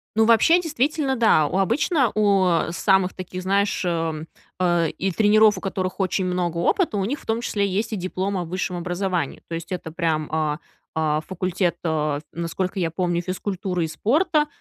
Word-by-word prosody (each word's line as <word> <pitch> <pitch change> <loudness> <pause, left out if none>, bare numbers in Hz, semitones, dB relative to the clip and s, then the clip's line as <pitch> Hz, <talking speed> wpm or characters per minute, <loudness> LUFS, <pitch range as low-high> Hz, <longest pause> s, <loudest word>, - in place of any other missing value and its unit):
Ну, 220 0 +4
вообще, 235 +10 +5
действительно, 295 -3 0
да. 220 - +4
У 185 - -2
обычно 260 - +2
у, 200 -3 +3
а, 170 -2 +1
самых 190 +1 +2
таких, 185 0 -7
знаешь, 200 +1 +1
э, - - 0
м, 165 -2 -2 0.3
а 175 -2 +2
и 190 +5 -2
тренеров, 215 +1 +4
у - - -6
которых 185 0 -3
очень 190 0 0
много 180 -2 -1
опыта, 220 - +1
у 195 - 0
них 275 +6 -2
в - - -18
том 225 +1 0
числе 205 -4 0
есть 200 +3 -1
и - - 0
диплом 185 +1 -2
о 175 - -1
высшем 180 +1 -3
образовании. 175 -2 -2
То 165 - -4
есть 170 +3 -7
это 170 -3 -4
прям, 160 -2 -1
а 155 -1 0 0.4
а, 155 -1 0
факультет, 180 0 -1
э, 150 -2 0
насколько 170 +3 -3
я 170 -3 0
помню, 175 0 -1
физкультуры 185 -1 -3
и - - -3
спорта, 300 - +1
185 Hz, 190 wpm, -23 LUFS, 170-205 Hz, 0.4 s, вообще